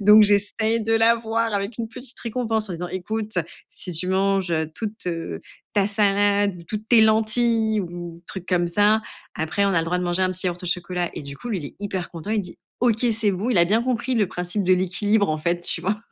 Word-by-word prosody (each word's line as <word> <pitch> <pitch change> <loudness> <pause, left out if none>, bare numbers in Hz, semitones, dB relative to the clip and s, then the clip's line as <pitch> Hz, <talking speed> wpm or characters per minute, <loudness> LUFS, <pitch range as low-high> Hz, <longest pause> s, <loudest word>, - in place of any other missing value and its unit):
Donc, 210 +1 +8
j'essaye 210 +2 +2
de 225 - 0
l'avoir 225 0 +2
avec 200 +3 -3
une 225 - -3
petite 250 +2 -6
récompense 225 -2 -1
en 180 - -4
disant: 175 +1 -5
«Écoute, 215 +2 -3 0.4
si 180 - -5
tu 170 +3 -1
manges, 195 -1 +1
heu, 160 -1 0
toute, 215 -3 -6
heu, 165 - -4 0.3
ta 200 -2 +2
salade 205 -1 +2
ou - - -11
toutes 215 +5 -5
tes 235 -2 +7
lentilles 220 0 +3
ou 175 -2 -7
truc 190 -2 -6
comme 180 -2 +1
ça, 205 +5 +3 0.3
après 170 +6 0
on - - +3
a 180 - +3
le 165 - +1
droit 175 +2 0
de - - -2
manger 175 +1 +1
un 185 - +2
petit 185 +1 -2
yaourt 175 0 -3
au 180 - -5
chocolat» 175 0 -1
et - - -6
du 140 0 -8
coup 240 - -7
lui 210 - -1
il 155 - -7
est - - -12
hyper 190 -3 -4
content, 165 +4 -7
il 220 -1 +1
dit: 180 -3 -8 0.2
«OK 240 -1 +2
c'est 220 -1 +2
bon» 205 +7 -2
il 205 - +3
a 170 - +7
bien 215 +6 +2
compris 250 0 -1
le 215 -4 +2
principe 180 +3 -2
de 185 - +4
l'équilibre 200 +3 +2
en 155 - -1
fait 170 +3 -1
tu - - 0
vois 205 +3 -1
200 Hz, 240 wpm, -23 LUFS, 180-220 Hz, 0.4 s, Donc